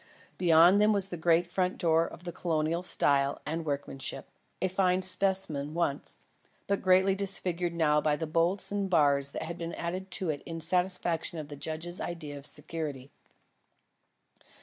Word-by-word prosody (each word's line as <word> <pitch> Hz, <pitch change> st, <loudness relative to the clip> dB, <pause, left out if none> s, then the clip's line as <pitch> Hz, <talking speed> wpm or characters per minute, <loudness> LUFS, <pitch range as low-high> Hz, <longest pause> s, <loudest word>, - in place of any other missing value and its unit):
Beyond 175 Hz, +3 st, +5 dB
them 215 Hz, +1 st, +4 dB
was 195 Hz, -1 st, +1 dB
the 175 Hz, -, -5 dB
great 170 Hz, +1 st, +2 dB
front 180 Hz, +1 st, -2 dB
door 165 Hz, -2 st, +2 dB
of 175 Hz, -, -12 dB
Colonial 165 Hz, 0 st, -1 dB
style 140 Hz, -5 st, +2 dB
and 165 Hz, +2 st, -3 dB
workmanship, 140 Hz, -2 st, -4 dB, 0.3 s
a 190 Hz, -, +1 dB
fine 185 Hz, 0 st, +1 dB
specimen 185 Hz, -6 st, +2 dB
once, 155 Hz, -5 st, -1 dB, 0.5 s
but 200 Hz, 0 st, -1 dB
greatly 190 Hz, +1 st, +4 dB
disfigured 180 Hz, -3 st, -1 dB
now 150 Hz, -2 st, +2 dB
by 150 Hz, -1 st, +1 dB
the 160 Hz, -, -4 dB
bolts 170 Hz, +6 st, +1 dB
and 200 Hz, -1 st, -2 dB
bars 140 Hz, -5 st, +3 dB
which -, -, -5 dB
had 170 Hz, +1 st, -7 dB
been 170 Hz, 0 st, -5 dB
added 185 Hz, +3 st, -5 dB
to 185 Hz, -4 st, 0 dB
it 145 Hz, -, -6 dB
in 165 Hz, 0 st, -6 dB
satisfaction 175 Hz, -1 st, 0 dB
of 150 Hz, -2 st, -7 dB
the 145 Hz, -, -7 dB
judge's 160 Hz, +4 st, -4 dB
ideas 155 Hz, -4 st, -6 dB
of 140 Hz, -, -14 dB
security. 150 Hz, -3 st, -5 dB
170 Hz, 160 wpm, -29 LUFS, 155-185 Hz, 0.5 s, Beyond